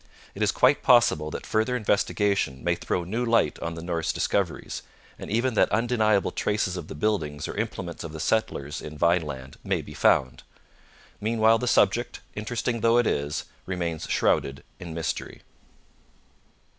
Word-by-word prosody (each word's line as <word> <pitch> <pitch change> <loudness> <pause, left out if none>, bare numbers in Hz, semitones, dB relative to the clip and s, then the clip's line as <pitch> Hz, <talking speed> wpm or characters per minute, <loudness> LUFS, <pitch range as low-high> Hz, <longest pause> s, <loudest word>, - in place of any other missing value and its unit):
It 100 - -8
is 105 -2 +3
quite 130 +3 +3
possible 120 - +4
that - - -6
further 110 +3 +1
investigation 100 - 0
may - - +2
throw 90 - -2
new 110 +8 -2
light 115 -1 +2
on 85 0 -4
the 80 - -7
Norse 85 -2 -1
discoveries, - - -1 0.4
and - - -7
even 120 +4 +1
that - - +3
undeniable 110 -3 +2
traces 105 -3 -1
of 85 -4 -6
the - - -8
buildings 75 -5 -1
or - - -6
implements 100 -5 -4
of 85 - -6
the 80 - -7
settlers 75 -8 -1
in 75 0 -8
Vineland 75 -5 0
may - - -1
be - - -10
found. 65 -1 +2 0.8
Meanwhile 110 +1 +3
the 125 - -2
subject, 120 +1 +2
interesting 115 +2 -2
though 115 +1 +4
it 120 - +4
is, 70 -4 -1 0.2
remains 85 -4 -3
shrouded 70 +1 +1 0.2
in 85 -2 -7
mystery. 80 -2 -4
100 Hz, 155 wpm, -26 LUFS, 80-115 Hz, 0.8 s, possible